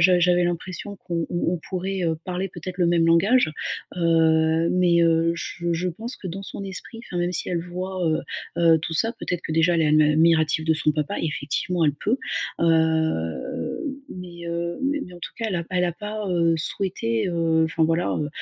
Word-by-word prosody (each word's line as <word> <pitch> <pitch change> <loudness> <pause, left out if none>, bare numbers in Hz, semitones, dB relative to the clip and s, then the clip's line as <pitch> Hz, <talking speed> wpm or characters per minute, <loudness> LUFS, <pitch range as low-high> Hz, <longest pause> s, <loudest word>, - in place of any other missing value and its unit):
j'a 180 +1 +5
j'avais 175 0 +4
l'impression 180 +3 -4
qu'on 170 -3 -3
on 175 0 0
pourrait, 190 0 -2
heu, 165 -1 +1
parler, 185 +1 -2
peut-être, 185 0 -8
le 175 - +3
même 170 -1 +3
langage. 180 +5 +4 0.5
Heu, 160 -1 +3
mais, 175 -2 +3
heu, 165 0 +3
je 170 0 -3
je 175 +2 -1
pense 225 +8 -6
que - - -9
dans 190 +3 -6
son 200 - -7
esprit, 195 +4 -6
enfin, 175 -5 -5
même 175 +1 0
si 175 - -2
elle 175 -2 0
voit, 180 +1 -4
heu 155 0 +2 0.4
heu, 165 -1 +5
tout 160 +1 -4
ça, 225 +8 +1
peut-être 175 -2 -3
que, - - -4
déjà, 165 +2 +3
elle 165 - +3
est - - +3
ad 155 +1 +5
admirative 160 -1 +3
de 160 - +4
son 155 0 +1
papa, 150 +6 -2
effectivement, 160 +3 -1
elle 150 - +3
peut. 215 - 0 0.4
Hem, 160 - +2 0.7
mais, 175 -2 -9
heu, 170 0 -3
mais 285 +2 0
mais 180 - -12
en 175 - -11
tout - - -6
cas, 230 - -2
elle 190 - -1
a 170 - -2
pas 180 - -5
elle 180 - +3
a 175 - 0
pas, 210 +2 -5
heu, 170 -1 +3
souhaité, 155 - -1
heu, 165 -2 +2
enfin, 160 0 +1
voilà, 165 +2 +1
heu, 150 - -1
170 Hz, 210 wpm, -24 LUFS, 160-180 Hz, 0.7 s, j'a